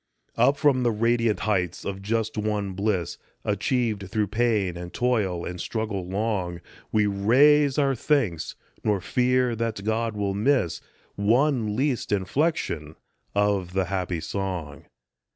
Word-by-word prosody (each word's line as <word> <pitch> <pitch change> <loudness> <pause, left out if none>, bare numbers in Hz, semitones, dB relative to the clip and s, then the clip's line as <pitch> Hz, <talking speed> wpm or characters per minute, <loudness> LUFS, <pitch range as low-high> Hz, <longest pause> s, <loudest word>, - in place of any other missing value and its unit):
Up 130 +5 +4
from 140 -3 +3
the 120 - +3
radiant 115 0 +1
heights 90 -6 -1
of 95 -1 -4
just 110 +2 -1
won 105 -2 -1
bliss, 100 -3 -1 0.3
Achieved 105 -1 0
through 105 -2 0
pain 105 -5 +1
and 90 0 -7
toil 105 -9 0
and 90 -1 -5
struggle 105 -5 -3
long, 95 -3 -2 0.3
We 105 -1 +3
raise 135 +8 +4
our 140 -2 +3
thanks, 120 - 0 0.3
nor 105 -2 +2
fear 125 +4 +1
that 115 -3 -3
God 110 +1 -1
will 100 -1 0
miss 110 - +1 0.3
One 115 +1 +2
least 130 -3 0
inflection 95 - -1 0.4
of 100 -3 +1
the 95 0 +1
happy 90 -3 -1
song. 90 -8 -4
105 Hz, 135 wpm, -25 LUFS, 95-120 Hz, 0.4 s, Up